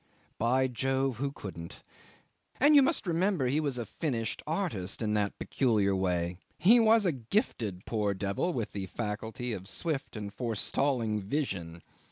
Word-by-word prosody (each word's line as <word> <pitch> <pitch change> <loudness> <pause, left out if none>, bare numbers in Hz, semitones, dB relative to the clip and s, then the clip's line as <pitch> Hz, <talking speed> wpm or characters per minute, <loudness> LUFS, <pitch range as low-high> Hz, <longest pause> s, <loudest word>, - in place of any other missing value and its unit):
By 130 +3 +3
Jove! 130 +1 0
who 140 +2 -1
couldn't? 90 -10 -8 0.8
And 290 +3 +6
you 285 - +9
must 275 -1 +1
remember 175 -3 +1
he 135 +5 +2
was 140 -5 -1
a 120 - -3
finished 120 -8 -3
artist 150 - -2
in 105 -1 0
that 105 -1 0
peculiar 105 -7 +1
way, 90 -2 0 0.2
he 230 +7 +6
was 225 -1 +5
a 175 - +4
gifted 115 - -2
poor 105 -3 0
devil 100 - -1
with 115 -10 -3
the 95 -2 -4
faculty 110 +4 -4
of 95 -2 -6
swift 150 - -3
and 105 -2 -5
forestalling 115 -1 0
vision. 95 - -3
120 Hz, 155 wpm, -30 LUFS, 100-150 Hz, 0.8 s, you